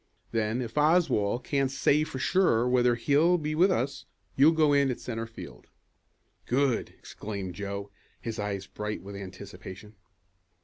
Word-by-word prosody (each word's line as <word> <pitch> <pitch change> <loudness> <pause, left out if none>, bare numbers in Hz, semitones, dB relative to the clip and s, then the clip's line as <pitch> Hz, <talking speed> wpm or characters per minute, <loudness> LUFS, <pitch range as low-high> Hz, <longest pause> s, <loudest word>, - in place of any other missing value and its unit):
Then 115 +2 0
if 115 +5 -3
Oswald 145 - +2
can't 135 -2 0
say 145 +2 +2
for 145 - -6
sure 130 -6 +2
whether 125 -1 +3
he'll 150 +9 +3
be 155 -2 -3
with 175 +5 +4
us, 140 -6 -1 0.3
you'll 145 +4 +6
go 155 -3 +3
in 140 -1 +3
at 125 - -3
centre 115 -1 -5
field." 115 - -11 0.8
"Good!" 130 -1 0
exclaimed 100 -4 -6
Joe, 100 +1 -5 0.3
his 115 -1 -5
eyes 100 -2 -3
bright 105 -1 -5
with 100 +1 -8
anticipation. 100 +1 -9
120 Hz, 145 wpm, -28 LUFS, 105-145 Hz, 0.8 s, you'll